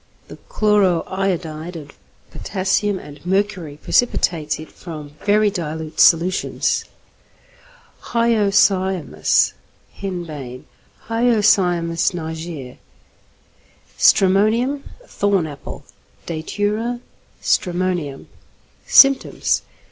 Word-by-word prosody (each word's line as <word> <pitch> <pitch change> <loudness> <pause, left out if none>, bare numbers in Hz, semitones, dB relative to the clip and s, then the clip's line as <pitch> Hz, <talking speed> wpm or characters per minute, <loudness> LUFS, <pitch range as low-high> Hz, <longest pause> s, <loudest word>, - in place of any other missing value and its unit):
The - - -10
chloro 205 -5 +2
iodide 175 -3 -3
of 145 -3 -9 0.4
potassium 195 +1 -1
and 145 -4 -12
mercury 185 -5 -1
precipitates 165 -7 0
it 155 - -10
from 155 -4 -9
very 210 0 +3
dilute 160 -4 -5
solutions. 175 +3 +3 1.2
=Hyoscyamus= 200 -6 +2 0.4
(Henbane). 155 -10 -6 0.4
Hyoscyamus 195 -8 +2
niger. 160 -5 -6 1.2
=Stramonium= 220 +9 +3 0.2
(Thorn 200 - 0
Apple). 145 -2 -9 0.4
Datura 205 +8 -2 0.4
stramonium. 175 -6 -1 0.6
_Symptoms. 275 -1 +4
185 Hz, 70 wpm, -20 LUFS, 160-205 Hz, 1.2 s, Symptoms